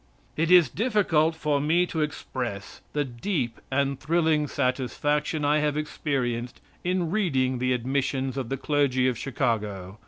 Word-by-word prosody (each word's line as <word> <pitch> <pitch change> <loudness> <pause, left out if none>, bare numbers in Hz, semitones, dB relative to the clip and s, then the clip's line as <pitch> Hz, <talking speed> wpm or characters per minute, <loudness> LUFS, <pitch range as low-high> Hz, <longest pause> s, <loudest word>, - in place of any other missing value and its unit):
It 165 +1 0
is 180 -4 +7
difficult 175 - +2
for 150 -3 0
me 165 +5 +3
to 160 -2 -3
express 125 -8 -4
the 145 -1 0
deep 125 - -3
and 140 0 0
thrilling 160 -2 +2
satisfaction 145 +3 -1
I 150 +1 +3
have 150 -1 0
experienced 125 -5 -2 0.2
in 180 -2 0
reading 135 - +1
the 125 +1 +1
admissions 130 +1 -1
of 130 -4 -3
the 135 - -2
clergy 135 -2 +1
of 125 - +1
Chicago. 105 -6 -2
140 Hz, 145 wpm, -26 LUFS, 125-155 Hz, 0.2 s, is